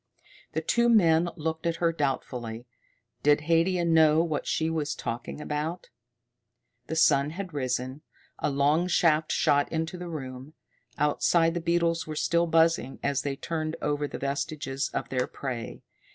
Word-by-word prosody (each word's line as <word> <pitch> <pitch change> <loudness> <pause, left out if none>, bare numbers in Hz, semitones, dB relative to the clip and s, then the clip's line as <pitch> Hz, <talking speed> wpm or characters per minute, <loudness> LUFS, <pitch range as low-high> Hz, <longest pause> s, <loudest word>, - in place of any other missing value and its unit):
The 160 - -1
two 235 +8 +2
men 175 -6 +4
looked 160 0 -3
at 165 - 0
her 165 0 +1
doubtfully. 125 -6 -3 0.6
Did 145 0 +4
Haidia 170 +3 +2
know 160 -1 +5
what 160 -3 -3
she 160 - 0
was 155 -2 -2
talking 120 +5 -5
about? 150 +4 -4 1.0
The 160 - -3
sun 145 -3 +4
had 180 +1 -6
risen. 130 0 -2 0.4
A - - 0
long 145 +5 +2
shaft 160 -3 +2
shot 145 -2 +2
into 165 +2 -3
the 175 -1 -6
room. 135 -1 -7 0.4
Outside 165 +3 +2
the 175 - -2
beetles 170 -1 +1
were 155 - -5
still 170 +2 +1
buzzing 165 -4 +2
as 140 -1 +1
they 140 -1 -3
turned 155 +2 -3
over 145 0 -1
the - - -6
vestiges 140 0 -3
of - - -3
their 125 -1 0
prey. 125 -4 -6
155 Hz, 150 wpm, -27 LUFS, 140-165 Hz, 1.0 s, know